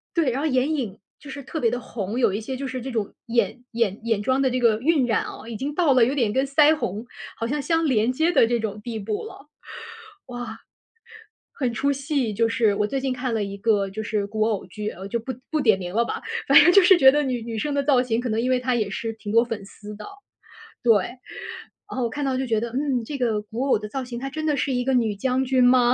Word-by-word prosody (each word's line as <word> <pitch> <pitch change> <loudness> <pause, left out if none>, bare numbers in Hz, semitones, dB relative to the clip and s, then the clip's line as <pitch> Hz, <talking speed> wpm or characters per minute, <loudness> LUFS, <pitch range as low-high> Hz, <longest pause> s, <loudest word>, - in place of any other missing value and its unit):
对， 315 -6 +2
然 260 +3 -2
后 315 - 0
眼 275 +2 +1
影 225 -9 -3 0.2
就 285 - -11
是 280 +1 -7
特 315 +4 -5
别 230 - +2
地 245 +1 -3
红， 215 +1 -5
有 200 - +3
一 205 - -2
些 260 +4 -5
就 275 +1 -4
是 255 -1 -4
这 265 +2 -6
种 215 -3 -3
眼 235 +1 0
眼 225 -4 0
眼 225 -3 0
妆 260 +5 +1
的 265 - +2
这 255 0 -1
个 225 -3 +3
晕 285 -3 +2
染 225 - +1
啊， 225 - -9
已 225 - -5
经 285 +6 -4
到 310 -6 +3
了 245 -2 +6
有 260 - 0
点 235 -7 +1
跟 265 +3 +1
腮 300 +2 +5
红 215 -3 -4 0.3
好 230 - -2
像 290 +4 -1
相 330 +2 +1
连 240 -3 +2
接 320 +6 +1
的 265 -7 +5
这 235 -1 0
种 210 -1 -4
地 230 -1 -5
步 210 +1 -3
了。 295 - -12 0.8
哇。 245 -3 -7 1.0
很 255 -4 0
出 275 +5 0
戏 275 -4 -1
就 230 +2 +1
是。 225 -3 +2
我 210 - +1
最 270 +6 -2
近 265 -1 -1
看 250 -1 -3
了 220 - 0
一 200 0 -4
个 205 -2 +1
就 220 +3 -5
是 205 -1 -2
古 215 +1 -1
偶 215 -3 -1
剧， 210 +3 -5
呃， 190 0 -8
就 235 - -1
不 260 +3 -5 0.2
不 310 -1 0
点 220 -7 +4
名 180 +2 -6
了 235 - +3
吧， - - -4 0.3
反 - - +9
正 - - +7
就 395 - +8
是 360 0 +7
觉 265 -3 +8
得 295 0 +2
女 250 -3 -2
女 230 -1 -5
生 290 +6 -2
的 280 - +1
造 270 -3 +3
型 235 -2 -1
可 250 - -3
能 225 0 0
因 250 - -1
为 255 - +3
她 250 0 0
也 215 -4 0
是 225 +3 -4
挺 205 -1 -7
多 230 +1 +5
粉 225 -4 -5
丝 210 +1 -11
的。 210 - -9 0.8
对， 235 -2 +5
然 250 0 -10 0.6
后 - - 0
我 235 - 0
看 290 +4 -3
到 265 -1 0
就 260 0 -2
觉 220 -2 +1
得， 235 +1 -3
嗯， 260 -2 -1
这 290 - -5
个 225 -4 +1
古 225 +5 -4
偶 270 - +4
的 210 0 -7
造 265 +3 -4
型 245 -1 -7
她 270 - -4
真 310 +3 -5
的 295 -2 +1
是 265 +1 0
一 245 - 0
个 265 0 +1
女 225 -4 +1
将 260 +5 0
军 255 -1 +3
吗？ 245 -1 +5
245 Hz, 290 characters per minute, -24 LUFS, 220-270 Hz, 1.0 s, 反